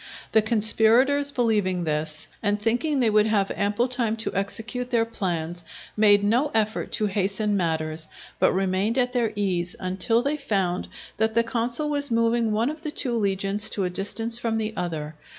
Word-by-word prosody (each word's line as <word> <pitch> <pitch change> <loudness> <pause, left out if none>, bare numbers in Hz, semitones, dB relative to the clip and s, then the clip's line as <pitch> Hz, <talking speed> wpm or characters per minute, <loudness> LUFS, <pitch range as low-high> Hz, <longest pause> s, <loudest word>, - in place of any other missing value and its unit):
The 220 - +5
conspirators 230 +6 +3
believing 210 -9 0
this, 155 0 -2
and 205 -1 0
thinking 245 +7 0
they 235 - +3
would 210 0 +4
have 205 -3 +1
ample 205 +4 0
time 240 -3 0
to 225 - -3
execute 225 +5 -3
their 230 -2 +2
plans, 175 -6 -4 0.3
made 205 -1 +4
no 240 +8 +2
effort 215 0 0
to 215 - +1
hasten 200 +1 0
matters, 160 -3 -1 0.3
but - - +4
remained 195 +5 0
at 250 -1 +1
their 235 -3 0
ease, 185 -1 -1
until 195 +5 +1
they 285 +2 -1
found 195 -10 -1 0.3
that 220 0 0
the 230 - +4
consul 235 +5 -1
was 285 -1 +1
moving 230 -1 +1
one 225 +6 +1
of 310 0 -10
the 310 - -4
two 255 -5 0
legions 200 0 +1
to 200 - -1
a 180 - -2
distance 225 +5 -1
from 230 -2 -1
the 220 0 -2
other. 155 -3 -4
215 Hz, 175 wpm, -24 LUFS, 195-235 Hz, 0.3 s, The